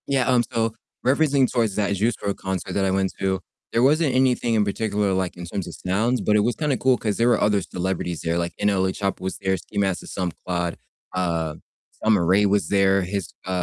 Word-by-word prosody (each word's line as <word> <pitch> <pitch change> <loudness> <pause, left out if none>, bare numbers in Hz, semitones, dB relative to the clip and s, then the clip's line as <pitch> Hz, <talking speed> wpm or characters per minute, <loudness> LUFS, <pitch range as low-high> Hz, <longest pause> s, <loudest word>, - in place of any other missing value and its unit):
Yeah, 135 -3 +1
um, 125 -2 +4
so 115 -2 0 0.3
referencing 140 -1 +3
towards 115 -5 +1
that 100 -1 +1
Juice 110 +4 +1
WRLD 100 -1 -1
concert 95 -1 -4
that 100 - +1
I 95 - +1
went 95 0 +1
to, 95 -1 0 0.3
there 115 - +2
wasn't 150 0 +3
anything 125 -2 +2
in 105 -2 +3
particular, 105 -1 0
like, 95 -1 -2
in 85 - -6
terms 90 +2 -4
of 85 - -8
sounds, 110 +7 +1
but 105 - +2
it 105 - +5
was 120 +3 +1
kinda 150 -4 0
cool 130 -1 +3
'cause 105 -3 -2
there 115 - +3
were - - +3
other 105 -1 +2
celebrities 90 -2 -3
there, 85 0 -1
like, 85 0 -2
NLE 95 -2 +2
Choppa 100 -1 -3
was 95 0 -3
there, 95 -1 0
Ski 95 +4 -10
Mask 95 -3 +1
the - - -12
Slump 90 -3 -3
God, 85 -1 -2 0.4
uh, 85 -4 -1 0.5
Summer 105 -6 +3
Ray 95 +4 +4
was 100 0 +2
there, 95 -1 +3
his 95 -1 -3
uh - - -6
100 Hz, 225 wpm, -23 LUFS, 95-115 Hz, 0.5 s, it